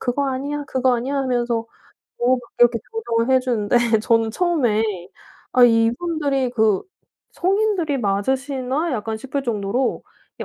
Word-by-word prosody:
"그거 270 +3 -1
아니야, 285 +3 -3
그거 260 -2 +1
아니야." 255 +4 -3
하면서 240 -3 0 0.5
뭐 250 +1 +2 0.2
이렇게 240 -1 +5
조정을 260 - 0
해 260 - +4
주는데 240 -4 0 0.2
저는 225 0 +2
처음에 245 -8 +1 0.7
'아 250 -1 +6
이분들이 265 +4 +1
그 220 -5 +2 0.5
성인들이 375 -6 0
맞으시나?' 265 +8 -1
약간 220 -2 -3
싶을 270 +5 -4
정도로 235 +1 -1 0.4
예 - - -3
255 Hz, 295 characters per minute, -21 LUFS, 230-280 Hz, 0.7 s, 아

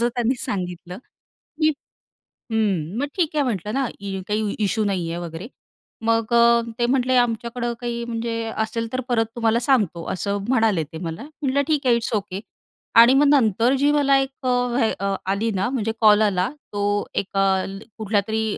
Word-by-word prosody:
असं 240 - +3
त्यांनी 245 +1 +1
सांगितलं 180 -1 -5 0.6
की 310 -1 +3 0.8
हम्म, 200 -4 0
मग 285 - -1
ठीक 325 -4 0
आहे 290 - +2
म्हटलं 210 -3 -2
ना, 270 -2 0
इ 195 -1 -5
काही 210 0 -1
इश्यू 215 +1 +1
नाही 180 -4 -1
आहे 170 - -4
वगैरे. 170 +5 -7 0.6
मग 230 0 +1
अ, 235 0 +5 0.2
ते 240 - +3
म्हटले 255 0 +2
आमच्याकडं 240 0 0
काही 235 -1 -3
म्हणजे 230 0 -3 0.2
असेल 230 +1 -4
तर 255 - -1
परत 225 -1 +3
तुम्हाला 230 0 +2
सांगतो, 205 - +1
असं 200 +2 -2
म्हणाले 220 -9 +2
ते 160 +2 -10
मला. 165 +6 -5 0.2
म्हटलं 280 0 +1
ठीक 295 -4 0
आहे, 240 - +5
इट्स 235 +1 -2
ओके. 195 -1 -3 0.6
आणि 235 +2 +8
मग 285 +2 +5
नंतर 235 -2 +3
जी 290 +1 +3
मला 280 -2 +4
एक 270 0 -1 0.2
अ, - - +2 0.2
व्हे 235 -2 +2
अ, 200 0 -1 0.2
आली 215 +3 0
ना 190 +5 0
म्हणजे 225 -4 -1
कॉल 210 0 +6
आला 190 -2 +2 0.2
तो 205 - -2 0.3
एका 195 0 0 0.2
ल 195 0 -7 0.2
कुठल्यातरी 220 +1 0
225 Hz, 180 wpm, -22 LUFS, 200-245 Hz, 0.8 s, आणि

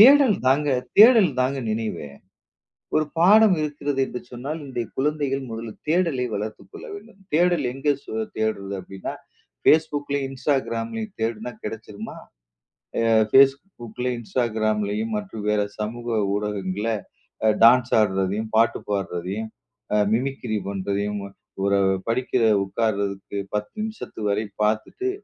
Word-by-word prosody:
தேடல் 265 -2 +8
தாங்க, 145 +3 +3 0.3
தேடல் 220 -5 +8
தாங்க 135 +2 +1
நினைவே. 110 -9 -3 0.9
ஒரு 155 - +3
பாடம் 205 +3 +7
இருக்கிறது 145 -2 -2
என்று 125 - -6
சொன்னால் 140 +6 -5
இன்றைய 125 -4 -4
குழந்தைகள் 140 -1 0
முதலில் 115 -1 -7
தேடலை 160 -6 +2
வளர்த்துக்கொள்ள 100 -2 -6
வேண்டும். 205 0 -12
தேடல் 175 -2 +3
எங்க 145 +2 +1
சு - - -9 0.3
தேட்றது 100 -3 -1
அப்படின்னா 95 +1 -6 0.5
Facebook-லயும், 145 -3 +2
Instagram-லயும் 135 - -2
தேடுனா 115 +1 -2
கிடைச்சுடுமா? 105 0 -7 0.9
அ - - +3 0.2
Facebook-ல, 135 - +3
Instagram-லயும் 110 -2 -1
மற்றும் 105 +1 -5
வேற 105 0 +2 0.2
சமூக 120 +3 -4 0.3
ஊடகங்கள்ல 105 +1 -2 0.6
அ - - +6
டான்ஸ் 120 +1 +6
ஆட்றதையும், 100 +1 +1
பாட்டு 115 +1 +3
பாட்றதையும், 100 +2 -3 0.5
அ - - +4 0.2
மிமிக்ரீ 125 -2 -1
பண்றதையும் 100 +1 -2 0.4
ஒரு 100 0 +3 0.3
படிக்கிற 125 +1 0 0.2
உக்காருறதுக்கு 100 -1 -2 0.2
1௦ 105 0 -2
நிமிஷத்து 220 - -6
வரை 105 +2 0 0.2
பார்த்துட்டு 110 - 0
115 Hz, 110 wpm, -24 LUFS, 105-145 Hz, 0.9 s, தேடல்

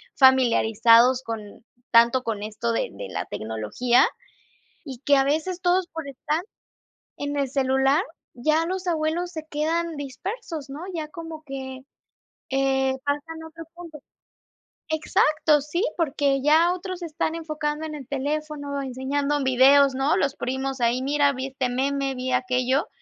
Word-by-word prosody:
familiarizados 245 -1 +5
con 220 -2 -7 0.3
tanto 235 +2 +5
con 215 -3 -3
esto 220 +2 -3
de 355 - -1
de - - -7
la - - -4
tecnología, 110 - +1 0.8
y 265 -5 -8
que 285 - +5
a 270 - +4
veces 320 +6 -1
todos 360 0 +2
por 320 -4 -7
estar 280 +3 -2 0.8
en 285 0 -4
el 280 -1 0
celular, 270 +3 +2 0.3
ya 310 +6 +1
los 375 +1 -4
abuelos 335 +1 -1
se 315 -2 -6
quedan 325 +2 -1
dispersos, 315 - -6
¿no?, 285 +3 -7
ya 315 -2 -4
como 325 -1 -8
que, 265 -1 -6 0.7
eh, 265 0 +2
pasan 295 +3 -3
a - - -8
otro 330 +1 -10
punto, 340 -3 -10 0.9
exacto, 305 -1 +2
sí, 300 +7 -2
porque 280 -4 +1
ya 320 +5 +4
otros 370 0 -6
se - - -3
están 315 +1 -2
enfocando 305 -1 -3
en 310 - -6
el 275 -4 -9
teléfono, 285 0 -3
enseñando 280 +3 -1
videos, 265 +2 +5
¿no?, 270 +5 +2
los 280 -7 0
primos 265 +1 -3
ahí: 235 +2 +2
"Mira, 285 +1 +2
vi 260 0 -4
este 265 -1 -2
meme, 270 +2 -1
vi 255 0 -3
aquello", 255 - +1
280 Hz, 150 wpm, -24 LUFS, 260-315 Hz, 0.9 s, familiarizados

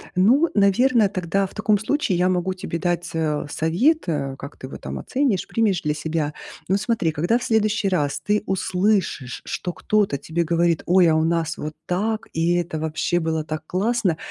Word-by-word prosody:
Ну, 250 - +4
наверно, 215 +3 +4
тогда 190 0 -1
в - - -18
таком 215 -1 +2
случае 220 -5 0
я 180 +1 +2
могу 185 +1 0
тебе 185 -2 -5
дать, 175 0 -1
э, 155 -3 -1
совет, 190 - +1
э, 140 -4 -2
как 140 - -9
ты 130 - -8
его - - -8
там - - -6
оценишь, 255 -8 0
примешь 210 -6 +1
для 150 0 0
себя. 150 -1 -2 0.3
Ну 190 - +2
смотри, 210 -6 0
когда 175 +10 +1
в - - -7
следующий 215 -2 +1
раз 145 -7 0
ты 210 0 +1
услышишь, 185 - 0
что 180 -2 -4
кто-то 205 -9 +1
тебе 165 +4 -2
говорит: 170 0 +1
"Ой, 180 -1 +5
а 160 - +3
у 160 - +2
нас 165 0 0
вот 155 +1 -5
так, 215 +5 -1
и 165 +2 +1
это 170 -3 -2
вообще 160 +2 0
было 160 -1 -1
так 155 0 -5
классно", 195 -1 0
180 Hz, 190 wpm, -22 LUFS, 160-210 Hz, 0.3 s, Ой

